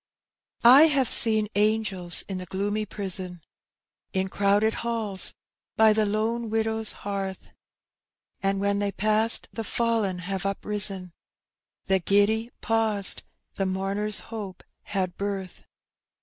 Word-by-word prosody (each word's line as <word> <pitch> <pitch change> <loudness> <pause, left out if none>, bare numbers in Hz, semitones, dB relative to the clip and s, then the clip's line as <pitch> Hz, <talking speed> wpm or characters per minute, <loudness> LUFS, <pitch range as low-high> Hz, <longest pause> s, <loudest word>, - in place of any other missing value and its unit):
I 270 +6 +9
haye 280 -4 +2
seen 220 -3 +4
angels 205 -4 +1
in 190 -2 -6
the 180 - -8
gloomy 205 +2 -3
prison, 185 -4 -5 0.7
In 190 0 -1
crowded 205 +3 +1
halls, 225 -5 +2 0.4
bj 220 -1 +5
the 215 -1 +1
lone 220 +2 -2
widow's 220 0 -1
hearth; 195 -2 -5 0.9
And 195 0 0
when 200 0 0
thej 200 -1 -3
paesed 215 +2 +3
the 225 - -5
fallen 225 -5 -1
have 190 +1 -5
uprisen, 195 -2 0 0.7
The 190 0 +2
giddj 205 +5 +1
paused, 220 -3 +1 0.4
the 195 - -1
mourner's 195 +3 -2
hope 205 -5 -7 0.3
bad 185 -3 -2
birth. 195 -2 -5
205 Hz, 120 wpm, -25 LUFS, 195-220 Hz, 0.9 s, I